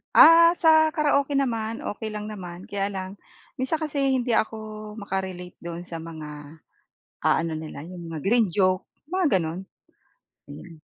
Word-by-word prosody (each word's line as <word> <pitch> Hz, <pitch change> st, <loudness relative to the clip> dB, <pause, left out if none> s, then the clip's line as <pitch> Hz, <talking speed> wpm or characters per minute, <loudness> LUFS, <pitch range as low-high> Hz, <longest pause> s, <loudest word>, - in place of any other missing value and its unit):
Ah, 335 Hz, +1 st, +9 dB
sa 325 Hz, -2 st, +5 dB, 0.2 s
karaoke 285 Hz, -2 st, +2 dB
naman 230 Hz, -4 st, -1 dB
okey 220 Hz, +1 st, -4 dB
lang 210 Hz, 0 st, -5 dB
naman. 180 Hz, -3 st, -8 dB
Kaya 200 Hz, 0 st, 0 dB
lang 190 Hz, -2 st, -5 dB, 0.5 s
minsan 260 Hz, +5 st, 0 dB
kasi 300 Hz, -2 st, -3 dB, 0.2 s
hindi 245 Hz, -1 st, 0 dB
ako 215 Hz, -1 st, -2 dB
maka-relate 190 Hz, -3 st, -5 dB
do'n 170 Hz, 0 st, -6 dB
sa 170 Hz, -2 st, -7 dB
mga, 155 Hz, -2 st, -9 dB, 0.7 s
ah, -, -, +4 dB
ano 165 Hz, -1 st, -3 dB
nila, 155 Hz, -2 st, -7 dB
'yong 175 Hz, +2 st, -9 dB
mga 160 Hz, -, -4 dB
green 225 Hz, +5 st, +3 dB
joke, 185 Hz, 0 st, +2 dB, 0.2 s
mga 335 Hz, -, +2 dB
gano'n. 165 Hz, +2 st, -4 dB, 0.9 s
Mm. 160 Hz, +2 st, -11 dB
200 Hz, 150 wpm, -25 LUFS, 170-235 Hz, 0.9 s, Ah